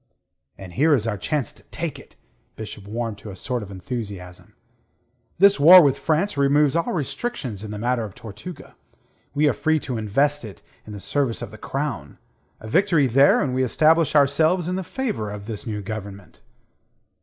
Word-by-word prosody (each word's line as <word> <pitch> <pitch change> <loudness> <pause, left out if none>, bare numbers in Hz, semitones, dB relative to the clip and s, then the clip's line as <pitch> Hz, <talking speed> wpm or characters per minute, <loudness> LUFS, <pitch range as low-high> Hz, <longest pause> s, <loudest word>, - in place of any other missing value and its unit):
"And 95 -3 -10
here 150 - +4
is 115 -5 -2
our 115 -2 -1
chance 135 - -2
to - - -19
take - - -5
it." - - -17 0.4
Bishop 105 -2 -9
warmed 115 -1 -4
to 105 - -10
a 95 - -8
sort 125 +6 -3
of 100 - -8
enthusiasm. 100 -1 -7 0.8
"This 200 -2 +5
war 175 +6 +10
with 140 -2 +3
France 165 +2 0
removes 140 +1 +3
all 170 - 0
restrictions 140 - -4
in 110 - -7
the 105 - -5
matter 120 +2 0
of 105 -3 -8
Tortuga. 115 - -10 0.6
We 150 +1 +3
are 140 - +3
free 160 +6 +1
to 125 -4 -4
invest 140 +7 +1
it 105 -4 -10 0.2
in 105 - -8
the 105 - -7
service 135 +2 -1
of - - -7
the 110 - -12
Crown. 135 - -4 0.4
A 110 - -10
victory 165 - +3
there 135 +3 +4
and 130 -3 -2
we 130 - 0
establish 155 +5 +3
ourselves 155 +5 +3
in 180 - -1
the 190 - -3
favour 210 - -3
of 100 0 -7
this 110 -1 -6
new 105 -2 -4
government." 100 -2 -8
125 Hz, 185 wpm, -23 LUFS, 105-150 Hz, 0.8 s, war